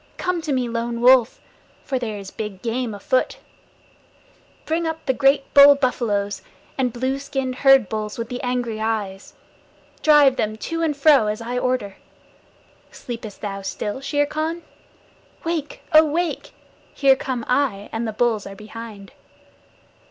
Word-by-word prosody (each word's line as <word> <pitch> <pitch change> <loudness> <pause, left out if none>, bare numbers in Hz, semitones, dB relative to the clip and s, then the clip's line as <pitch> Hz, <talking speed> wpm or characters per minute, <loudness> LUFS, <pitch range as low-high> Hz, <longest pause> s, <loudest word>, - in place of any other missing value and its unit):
Come 360 -2 -1
to 315 -2 -4
me, 255 -2 0
Lone 235 0 -3
Wolf, 250 -1 +5 0.4
for 265 -2 -2
there 220 -4 -4
is 195 -1 -9
big 210 -3 -7
game 235 -1 -2
afoot! 255 +5 0 1.3
Bring 325 +1 -1
up 320 0 -5
the 265 - +2
great 275 +1 +2
bull 285 0 +9
buffaloes, 215 -7 -1 0.3
the 265 - 0
blue 260 +3 -2
skinned 270 -2 -3
herd 270 -5 +5
bulls 215 +1 -4
with 230 -1 -4
the 250 0 -5
angry 245 -3 -2
eyes. 205 -3 -3 0.7
Drive 290 -4 +5
them 215 0 -1
to 330 +8 -4
and 310 -3 0
fro 280 -6 +5
as 210 +1 -2
I 240 +2 -3
order. 250 -6 -2 0.9
Sleepest 230 -4 -8
thou 195 -2 -4
still, 205 +5 -4
Shere 290 +1 +1
Khan? 315 +3 -3 0.8
Wake, 325 -3 -4
oh, 310 +1 +8
wake! 330 +3 -2 0.4
Here 275 -2 +5
come 255 -3 -4
I, 250 -7 0
and 225 +1 -3
the - - -2
bulls 220 -1 0
are 195 - -9
behind. 215 -1 -10
250 Hz, 150 wpm, -22 LUFS, 215-280 Hz, 1.3 s, bull